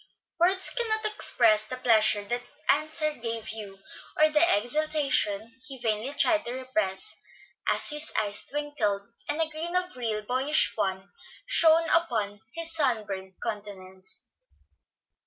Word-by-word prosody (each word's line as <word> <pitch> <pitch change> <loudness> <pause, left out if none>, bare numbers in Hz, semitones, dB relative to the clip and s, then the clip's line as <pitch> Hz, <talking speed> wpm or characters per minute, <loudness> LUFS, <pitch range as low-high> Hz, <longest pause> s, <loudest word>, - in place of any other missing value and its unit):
Words 370 +2 +2
cannot 440 -3 0
express 225 - +4
the 255 - -5
pleasure 220 -4 +3
that 240 +4 -3 0.3
answer 305 +2 +2
gave 230 -4 -5
Hugh, 210 -3 -7 0.4
or 310 0 +4
the 300 0 +3 0.2
exultation 260 -4 0
he 270 -2 -6
vainly 225 +1 -2
tried 320 +1 +3
to 240 - -4
repress, 255 - -3 0.5
as - - -1
his 300 +1 -3
eyes 205 -1 0
twinkled 275 -9 -2 0.2
and 295 +2 -2
a 325 - +1
grin 320 +3 -5
of 365 -3 0
real 225 -4 -3
boyish 260 +7 +2
fun 190 0 -3 0.3
shone 330 -8 +4
upon 220 -11 0
his 330 0 -1
sunburnt 210 - -1
countenance. 195 -4 -8
250 Hz, 130 wpm, -27 LUFS, 210-310 Hz, 0.5 s, express